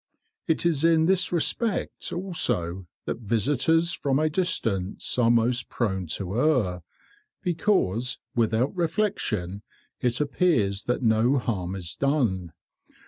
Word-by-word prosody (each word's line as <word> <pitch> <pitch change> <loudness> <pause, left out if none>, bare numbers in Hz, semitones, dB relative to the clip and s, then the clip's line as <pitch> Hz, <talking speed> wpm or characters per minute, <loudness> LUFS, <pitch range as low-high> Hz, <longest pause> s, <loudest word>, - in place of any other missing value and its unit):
It 160 0 +1
is 160 -4 +2
in 165 -1 +4
this 190 +1 +2
respect 200 +5 -1
also 95 - -1 0.2
that - - -3
visitors 145 - +1
from 135 -4 0
a 155 +1 +1
distance 115 - -1
are 115 -1 +4
most 120 +1 +2
prone 95 -6 -1
to 100 +3 -3
err, 110 - +2 0.6
because, 160 - +1 0.2
without 115 - +1
reflection, 160 - -1 0.4
it 120 -1 0
appears 135 - +1
that 125 +1 -1
no 115 +4 +3
harm 95 -7 -2
is 85 -3 -6
done. 115 - 0
125 Hz, 120 wpm, -26 LUFS, 100-160 Hz, 0.6 s, in